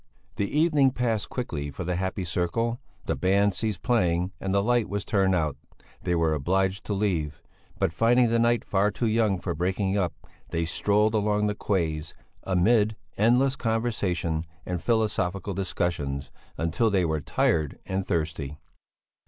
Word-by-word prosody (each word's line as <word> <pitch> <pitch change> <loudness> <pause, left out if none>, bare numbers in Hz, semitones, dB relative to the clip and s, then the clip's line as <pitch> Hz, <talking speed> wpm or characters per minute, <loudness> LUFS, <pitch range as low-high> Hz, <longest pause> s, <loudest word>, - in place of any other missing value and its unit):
The 100 - 0
evening 150 -3 +4
passed 120 -5 -1
quickly 80 - -3
for 70 +6 -6
the 90 +1 -1
happy 95 +1 -2
circle; 95 +7 -1 0.3
the - - 0
band 100 +2 +2
ceased 105 -3 -2
playing 90 -6 +1
and 95 - -2
the 100 0 +2
light 120 -1 +2
was 100 -1 -3
turned 95 -2 +2
out; 75 -5 0 0.4
they 90 -1 0
were 80 -2 +2
obliged 95 +6 0
to 105 - -1
leave, 85 -8 -1 0.3
but, 80 - 0
finding 120 +5 +4
the 115 - +3
night 120 0 +2
far 100 +1 +2
too 110 +3 -2
young 110 -4 +2
for 90 -1 -3
breaking 95 +4 0
up, 90 -3 0 0.4
they 85 0 -1
strolled 105 +5 +2
along 105 -1 +1
the 105 - +1
quays, 80 -7 -2 0.3
amid 105 +4 +3 0.2
endless 125 +5 +3
conversation 95 -9 -1 0.2
and 90 -2 -3
philosophical 100 -4 0
discussions, 85 -7 -2 0.3
until 85 +8 +1
they 95 -4 +2
were 80 -2 -1
tired 75 0 +1
and 95 +1 -1
thirsty. 80 -4 -2
95 Hz, 155 wpm, -26 LUFS, 85-110 Hz, 0.4 s, evening